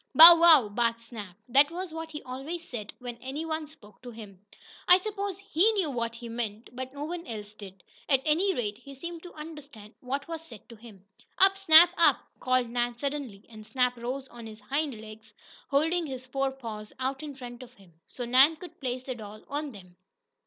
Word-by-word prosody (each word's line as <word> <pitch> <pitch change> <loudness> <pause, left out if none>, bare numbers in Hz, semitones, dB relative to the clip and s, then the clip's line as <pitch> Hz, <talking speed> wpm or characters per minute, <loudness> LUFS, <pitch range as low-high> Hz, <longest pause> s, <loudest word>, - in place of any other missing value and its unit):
"Bow 335 +2 +13
wow!" 325 -8 +7
barked 230 +2 0
Snap. 210 -6 -10
That 280 +4 +5
was 355 +1 -6
what 325 0 -6
he 300 -2 -8
always 280 +7 -6
said 215 -4 -6
when 245 -1 -8
any 275 +6 -5
one 315 -1 -3
spoke 210 -9 -18
to 250 - -9
him. 205 -5 -12 0.4
I 360 - +8
suppose 400 -1 -4
HE 395 +2 +2
knew 375 -8 0
what 230 -2 -3
he 235 0 -9
meant, 225 -1 -5
but 260 +1 -7
no 285 - -5
one 340 +2 -6
else 210 -2 -7
did. 195 -3 -12 0.3
At 270 -2 +3
any 340 +6 +2
rate, 210 -4 -3
he 275 -1 -12
seemed 340 +4 -7
to 355 - -12
understand 290 -9 -11
what 275 +2 -4
was 330 -1 -5
said 230 - -14
to 230 - -11
him. 210 -4 -15 0.3
"Up, 390 0 +5
Snap! 345 -3 +7
Up!" 335 - +5 0.2
called 255 -1 +1
Nan 240 0 -2
suddenly, 275 -7 -5
and 220 -2 -12
Snap 250 +3 0
rose 255 +3 -5
on 235 -1 -10
his 215 0 -11
hind 275 +2 -3
legs, 215 0 -13 0.3
holding 320 +4 +1
his 260 -2 -7
fore 270 +1 -1
paws 220 -5 -8
out 265 +1 -3
in 295 -2 -7
front 245 -2 -9
of 250 0 -13
him, 190 -6 -21
so 245 - -6
Nan 265 +6 +6
could 345 +1 -12
place 255 -1 -3
the 255 - -4
doll 215 -2 -11
on 290 0 -3
them. 180 -5 -15
255 Hz, 205 wpm, -28 LUFS, 230-315 Hz, 0.4 s, Bow